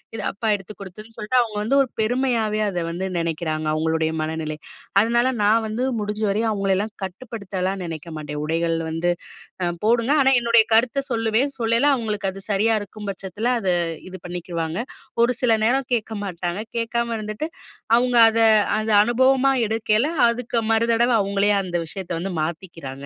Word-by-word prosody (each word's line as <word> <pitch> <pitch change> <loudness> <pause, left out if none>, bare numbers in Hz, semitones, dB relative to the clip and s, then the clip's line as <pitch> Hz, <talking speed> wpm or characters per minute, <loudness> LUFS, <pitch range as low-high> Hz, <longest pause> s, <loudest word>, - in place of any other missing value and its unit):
இது 220 - -4
அப்பா 220 +2 -3
எடுத்து 200 +2 -12
குடுத்ததுன்னு" 215 +4 -11
சொல்லிட்டு, 225 +4 +1
அவுங்க 220 -3 -3
வந்து 265 +6 +2
ஒரு 265 - 0
பெருமையாவே 225 -2 0
அதை 175 -3 -2
வந்து 185 +3 -3
நெனைக்கிறாங்க, 160 -2 -2
அவங்களுடைய 160 0 0
மனநிலை. 155 -1 -3 0.4
அதனால 235 +3 +2
நான் 220 +2 +3
வந்து 225 +4 -2 0.2
முடிஞ்ச 210 +1 -3
வரையும் 220 +2 0
அவங்களையல்லாம் 200 +1 0
கட்டுப்படுத்தல்லாம் 195 -2 -4
நெனைக்க 165 0 -7
மாட்டேன். 150 0 -5
உடைகள் 165 +1 0
வந்து 165 +2 0 0.5
அ - - +1 0.2
போடுங்க, 235 +3 +2
ஆனா 270 0 +4
என்னுடைய 235 -1 +5
கருத்தை 250 +4 +2
சொல்லுவேன். 230 +4 +1
சொல்லையில 230 +4 +2
அவங்களுக்கு 210 -5 -2
அது 195 - -10
சரியா 210 +3 +2
இருக்கும் 205 +1 -9
பட்சத்தில, 195 +4 -5
அதை 185 -3 +1 0.4
இது 185 - -8
பண்ணிக்குவாங்க. 170 -1 -4 0.4
ஒரு 240 - +3
சில 245 - +4
நேரம் 260 +2 +1
கேட்க 225 -1 -4
மாட்டாங்க. 175 0 -3 0.2
கேட்காம 235 0 -1
இருந்துட்டு, 215 +7 -4 0.5
அவுங்க 245 0 +2
அத 225 0 -1 0.4
அத 215 +1 -2
அனுபவமா 260 +3 +3 0.2
எடுக்கையில, 220 +3 +1 0.2
அதுக்கு 235 0 -1
மறுதடவை 230 +2 +3
அவுங்களே 200 +1 +1
அந்த 180 -2 -5
விஷயத்தை 180 +2 -6
வந்து 190 +3 -3
மாத்திக்கிறாங்க. 155 -4 -6
210 Hz, 155 wpm, -22 LUFS, 180-230 Hz, 0.5 s, என்னுடைய